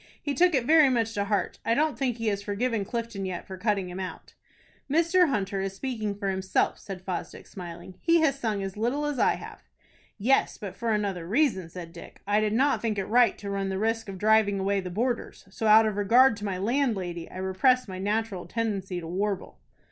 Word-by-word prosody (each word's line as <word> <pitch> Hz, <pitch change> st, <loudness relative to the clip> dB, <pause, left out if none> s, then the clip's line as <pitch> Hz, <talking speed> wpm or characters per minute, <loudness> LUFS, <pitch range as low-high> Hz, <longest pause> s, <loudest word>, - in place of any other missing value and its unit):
"He 285 Hz, -, -3 dB
took 350 Hz, +3 st, +4 dB
it 255 Hz, -3 st, +1 dB
very 310 Hz, -1 st, +6 dB
much 230 Hz, -3 st, 0 dB
to 200 Hz, -1 st, -1 dB
heart. 205 Hz, 0 st, -1 dB
I 230 Hz, -, +2 dB
don't 310 Hz, +2 st, +1 dB
think 250 Hz, -4 st, -1 dB
he 225 Hz, -1 st, 0 dB
has 200 Hz, -1 st, -2 dB
forgiven 210 Hz, +2 st, -1 dB
Clifton 230 Hz, -1 st, -4 dB
yet 185 Hz, -2 st, -4 dB
for 190 Hz, -, -7 dB
cutting 200 Hz, -1 st, 0 dB
him 180 Hz, +1 st, -7 dB
out." 185 Hz, -1 st, -7 dB, 0.6 s
"Mr. 335 Hz, +3 st, +4 dB
Hunter 195 Hz, -5 st, -1 dB
is 195 Hz, 0 st, -3 dB
speaking 215 Hz, -3 st, -3 dB
for 200 Hz, -1 st, -3 dB
himself," 190 Hz, 0 st, 0 dB
said 190 Hz, -2 st, -8 dB
Fosdick, 185 Hz, -2 st, -5 dB
smiling. 175 Hz, -1 st, -9 dB
"He 335 Hz, 0 st, +4 dB
has 275 Hz, -4 st, +2 dB
sung 215 Hz, -5 st, -1 dB
as 195 Hz, -1 st, -5 dB
little 245 Hz, +7 st, -1 dB
as 295 Hz, -3 st, -2 dB
I -, -, +3 dB
have." -, -, -10 dB, 0.6 s
"Yes, 250 Hz, +6 st, +2 dB
but 200 Hz, -3 st, -7 dB
for 235 Hz, -1 st, -2 dB
another 200 Hz, -5 st, -1 dB
reason," 215 Hz, -, +1 dB
said 170 Hz, -1 st, -9 dB
Dick. 170 Hz, -, -12 dB
"I 205 Hz, +1 st, +2 dB
did 215 Hz, -1 st, 0 dB
not 270 Hz, +5 st, +2 dB
think 220 Hz, -3 st, -1 dB
it 195 Hz, -, -1 dB
right 240 Hz, +3 st, +4 dB
to 200 Hz, -1 st, -6 dB
run 195 Hz, -1 st, -2 dB
the 190 Hz, -, -2 dB
risk 225 Hz, +1 st, -1 dB
of 190 Hz, -, -6 dB
driving 210 Hz, 0 st, +3 dB
away 195 Hz, +1 st, +1 dB
the 185 Hz, -1 st, -5 dB
boarders; 235 Hz, +5 st, -2 dB
so, 220 Hz, +2 st, -2 dB
out 220 Hz, +1 st, +7 dB
of 215 Hz, -2 st, -1 dB
regard 230 Hz, +5 st, +5 dB
to 210 Hz, -, -6 dB
my 195 Hz, -2 st, -2 dB
landlady, 195 Hz, -6 st, -1 dB
I -, -, -10 dB
repressed 205 Hz, +7 st, +2 dB
my 185 Hz, -1 st, -6 dB
natural 205 Hz, -1 st, -2 dB
tendency 200 Hz, -5 st, -2 dB
to 165 Hz, -, -7 dB
warble." 195 Hz, +2 st, -3 dB
210 Hz, 215 wpm, -27 LUFS, 190-240 Hz, 0.6 s, out